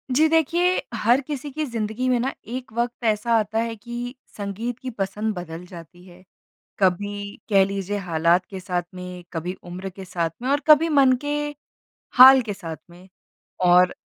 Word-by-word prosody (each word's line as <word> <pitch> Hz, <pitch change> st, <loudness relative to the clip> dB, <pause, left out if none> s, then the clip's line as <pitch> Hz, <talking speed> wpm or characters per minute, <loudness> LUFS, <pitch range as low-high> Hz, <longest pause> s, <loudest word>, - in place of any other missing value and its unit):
जी 315 Hz, +2 st, +5 dB
देखिए 340 Hz, +3 st, +2 dB
हर 235 Hz, +4 st, +3 dB
किसी 290 Hz, 0 st, -5 dB
की 310 Hz, +2 st, -2 dB
ज़िंदगी 230 Hz, +1 st, -3 dB
में 245 Hz, -1 st, +2 dB
ना 265 Hz, +3 st, -1 dB
एक 250 Hz, +1 st, -6 dB
वक़्त 240 Hz, +1 st, -2 dB
ऐसा 220 Hz, +1 st, +1 dB
आता 220 Hz, +1 st, -1 dB
है 230 Hz, 0 st, -2 dB
कि 240 Hz, +3 st, -6 dB, 0.2 s
संगीत 215 Hz, +4 st, -4 dB
की 255 Hz, -, -5 dB
पसंद 210 Hz, 0 st, -3 dB
बदल 175 Hz, -1 st, -7 dB
जाती 175 Hz, 0 st, -13 dB
है। 180 Hz, 0 st, -16 dB, 0.6 s
कभी 200 Hz, +2 st, -1 dB
कह 195 Hz, -2 st, +5 dB
लीजिए 195 Hz, +1 st, -3 dB
हालात 170 Hz, -1 st, +1 dB
के 190 Hz, -, -7 dB
साथ 180 Hz, -1 st, -2 dB
में, 180 Hz, -1 st, -8 dB
कभी 170 Hz, +2 st, -3 dB
उम्र 180 Hz, +2 st, -6 dB
के 190 Hz, +1 st, -10 dB
साथ 170 Hz, -2 st, -1 dB
में 255 Hz, -, -2 dB
और 285 Hz, +1 st, +3 dB
कभी 310 Hz, +2 st, +6 dB
मन 275 Hz, -4 st, +5 dB
के 290 Hz, 0 st, -1 dB, 0.8 s
हाल 260 Hz, +1 st, +10 dB
के 210 Hz, -3 st, -5 dB
साथ 165 Hz, -5 st, -7 dB
में। 180 Hz, +2 st, -16 dB, 0.6 s
और 180 Hz, +1 st, +5 dB
210 Hz, 175 wpm, -23 LUFS, 180-250 Hz, 0.8 s, हाल